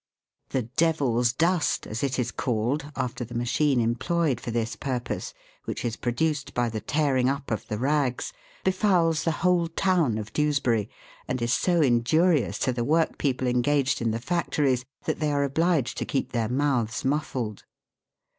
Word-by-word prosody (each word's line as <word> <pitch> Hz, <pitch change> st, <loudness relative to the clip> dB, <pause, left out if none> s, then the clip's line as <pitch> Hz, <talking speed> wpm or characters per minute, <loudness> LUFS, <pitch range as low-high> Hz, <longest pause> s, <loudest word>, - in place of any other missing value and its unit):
The 130 Hz, -, 0 dB
"devil's" 125 Hz, -3 st, +1 dB
dust, 165 Hz, +5 st, +1 dB
as 110 Hz, +4 st, -4 dB
it 135 Hz, -2 st, 0 dB
is 120 Hz, -2 st, -1 dB
called, 130 Hz, +5 st, -1 dB
after 125 Hz, 0 st, -3 dB
the 120 Hz, +1 st, -8 dB
machine 125 Hz, +3 st, +2 dB
employed 125 Hz, +4 st, 0 dB
for -, -, -5 dB
this 115 Hz, 0 st, -1 dB
purpose, 125 Hz, -3 st, -3 dB, 0.3 s
which -, -, -4 dB
is 115 Hz, -2 st, -1 dB
produced 145 Hz, +6 st, -1 dB
by 120 Hz, -1 st, +1 dB
the 110 Hz, -1 st, -4 dB
tearing 135 Hz, -3 st, +1 dB
up 140 Hz, -1 st, -3 dB
of 110 Hz, -, -2 dB
the 105 Hz, -, -3 dB
rags, 135 Hz, 0 st, 0 dB, 0.3 s
befouls 185 Hz, -4 st, +2 dB
the 165 Hz, -, +3 dB
whole 180 Hz, -2 st, +3 dB
town 165 Hz, -, +1 dB
of 110 Hz, 0 st, -6 dB
Dewsbury, 130 Hz, -8 st, +1 dB, 0.4 s
and 130 Hz, -, -1 dB
is 120 Hz, +1 st, +1 dB
so 175 Hz, +3 st, +2 dB
injurious 135 Hz, -, +3 dB
to 130 Hz, -, +1 dB
the 120 Hz, -1 st, -1 dB
workpeople 140 Hz, -3 st, +1 dB
engaged 130 Hz, +3 st, +1 dB
in 115 Hz, -, +1 dB
the 110 Hz, -, -1 dB
factories, 140 Hz, -2 st, 0 dB, 0.2 s
that -, -, -2 dB
they 150 Hz, -1 st, +1 dB
are 140 Hz, 0 st, +1 dB
obliged 150 Hz, 0 st, +1 dB
to -, -, -2 dB
keep 135 Hz, -, -2 dB
their 115 Hz, -2 st, -1 dB
mouths 125 Hz, -4 st, 0 dB
muffled. 130 Hz, -6 st, -2 dB
130 Hz, 165 wpm, -26 LUFS, 120-155 Hz, 0.4 s, the